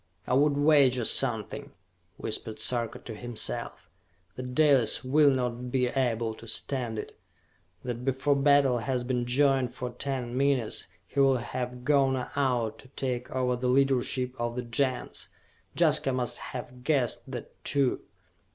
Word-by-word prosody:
"I - - -1
would 145 +2 +3
wager 140 -5 +4
something," 115 -6 0 0.4
whispered 110 -1 -4
Sarka 120 -3 -1
to 115 - -9
himself, 120 +1 -5 0.5
"that 125 0 -6
Dalis 140 -7 +4
will 145 +3 +5
not 125 -2 -1
be 125 -1 +2
able 120 -4 0
to 115 +1 -12
stand 115 0 -2
it! - - -7 0.6
That 125 -1 -4
before 135 +2 +1
battle 140 -3 +4
has 125 +1 -1
been 125 -1 -1
joined 130 -1 +2
for 125 -1 -4
ten 125 -1 -4
minutes, 135 -4 0 0.2
he 140 - -4
will 135 -1 +5
have 125 +1 -5
gone 135 -3 +2
out 125 -6 0
to - - -14
take 125 -1 -3
over 125 -1 0
the 125 +1 -2
leadership 130 -1 +1
of 120 0 -2
the 125 - -3
Gens! 125 +2 -2 0.5
Jaska 135 - +3
must 125 -2 -2
have 125 0 -8
guessed 135 -5 0
that, - - -8
too! 140 -3 +2
125 Hz, 145 wpm, -28 LUFS, 120-135 Hz, 0.6 s, will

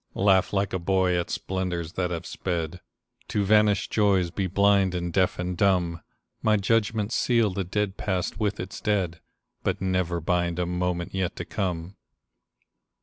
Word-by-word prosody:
Laugh 95 -1 +3
like 100 -1 0
a 95 - 0
boy 95 0 +2
at 85 -1 -1
splendors 90 -3 -3
that 90 -1 -1
have 85 -2 -4
sped, 85 -1 -3 0.5
To 100 -1 0
vanished 105 0 +3
joys 95 -5 +2
be 95 +1 -1
blind 100 0 +3
and 85 -1 -3
deaf 95 -2 +2
and 90 0 -2
dumb; 90 -3 +1 0.4
My 110 -1 +3
judgments 105 +1 +1
seal 115 -4 +2
the 95 +1 -2
dead 100 +2 -2
past 95 -2 -2
with 105 -2 -1
its 95 +2 -6
dead, 95 -6 0 0.4
But - - -1
never 90 -2 0
bind 85 0 0
a 90 - 0
moment 90 0 -2
yet 95 0 -1
to - - -5
come. 90 -1 -3
95 Hz, 160 wpm, -26 LUFS, 90-100 Hz, 0.5 s, Laugh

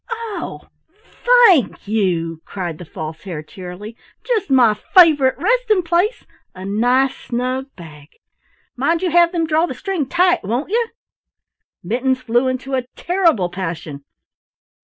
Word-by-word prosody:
"Oh, 460 -3 -5 0.8
thank 290 - +3
you!" 170 -6 -1
cried 175 -5 -6
the 175 - -9
False 160 0 -7
Hare 170 -6 -6
cheerily. 185 +6 -9 0.3
"Just 455 -9 -1
my 250 -5 +5
favorite 290 - +4
resting 435 -1 +1
place 355 +8 0 0.3
a 185 +1 -8
nice 245 +6 +1
snug 255 +2 -3
bag. 150 -5 -13 0.7
Mind 325 +7 0
you 360 - 0
have 345 0 +4
them 335 -2 0
draw 320 +2 +1
the - - -6
string 370 -9 -3
tight, 355 +4 +2
won't 240 - -3
you?" 465 +1 +1 1.0
Mittens 255 +7 0
flew 245 +1 +1
into 255 +1 -3
a 255 -2 -1
terrible 335 - +1
passion. 165 -6 -6
255 Hz, 135 wpm, -19 LUFS, -, 1.0 s, my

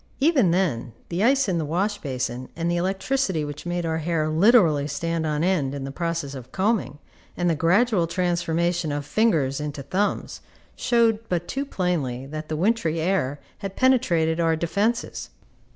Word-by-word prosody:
Even 275 - +4
then, 155 -10 0 0.2
the 180 +4 -1
ice 270 +2 +4
in 180 -3 0
the - - -1
wash 195 +7 -1
basin, 125 -2 -4
and 170 +1 -1
the - - +1
electricity 190 - 0
which 145 +3 -7
made 175 0 -2
our 160 0 -1
hair 160 -1 0
literally 160 - +4
stand 165 +2 -2
on 150 +1 0
end 155 -7 +1
in 140 - -5
the 135 - -5
process 165 -2 -3
of 130 -2 -9
combing, 190 - 0 0.4
and 175 - 0
the 170 - +3
gradual 180 +4 +3
transformation 170 -1 0
of 145 0 -3
fingers 155 -10 +1
into 145 -2 -5
thumbs, 190 +9 -2 0.3
showed 235 -3 +2
but 175 -1 -1
too 275 +1 -2
plainly 155 - -2
that 155 +2 -7
the 155 - -1
wintry 175 -3 +1
air 160 -5 0 0.2
had 195 -2 -6
penetrated 170 -11 +2
our 165 -1 +3
defences. 205 +8 -1
170 Hz, 170 wpm, -24 LUFS, 150-195 Hz, 0.4 s, Even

